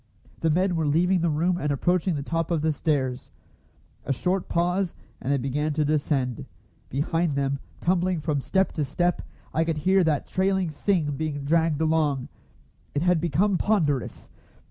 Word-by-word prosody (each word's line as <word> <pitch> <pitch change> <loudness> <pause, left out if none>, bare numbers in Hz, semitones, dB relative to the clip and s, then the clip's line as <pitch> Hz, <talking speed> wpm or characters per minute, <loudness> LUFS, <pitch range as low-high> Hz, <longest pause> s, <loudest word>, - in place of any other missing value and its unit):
The 165 - +1
men 180 +3 +2
were 160 -2 0
leaving 175 +4 +2
the 170 - +2
room 170 +4 +1
and 150 -2 -1
approaching 175 +4 +1
the 140 - -3
top 165 +2 -2
of 165 -3 0
the 160 -1 +2
stairs. 135 -4 -1 0.7
A - - -2
short 180 +7 -1
pause, 180 +2 0 0.3
and 130 - -1
they 140 - +3
began 145 +4 -1
to 150 0 +1
descend. 140 -5 0 0.4
Behind 160 +4 0
them, 140 0 0 0.2
tumbling 180 0 +1
from 150 -2 -1
step 190 +6 +1
to 155 - -2
step, 175 +6 0 0.3
I 160 - +2
could 165 -1 -1
hear 190 +5 +3
that 155 -4 +1
trailing 190 -2 0
"thing" 155 -1 0
being 150 -2 -3
dragged 160 0 +2
along. 155 -5 +1 0.7
It 145 - +1
had 180 -2 +3
become 175 +4 +1
ponderous! 155 - 0
160 Hz, 165 wpm, -25 LUFS, 145-175 Hz, 0.7 s, they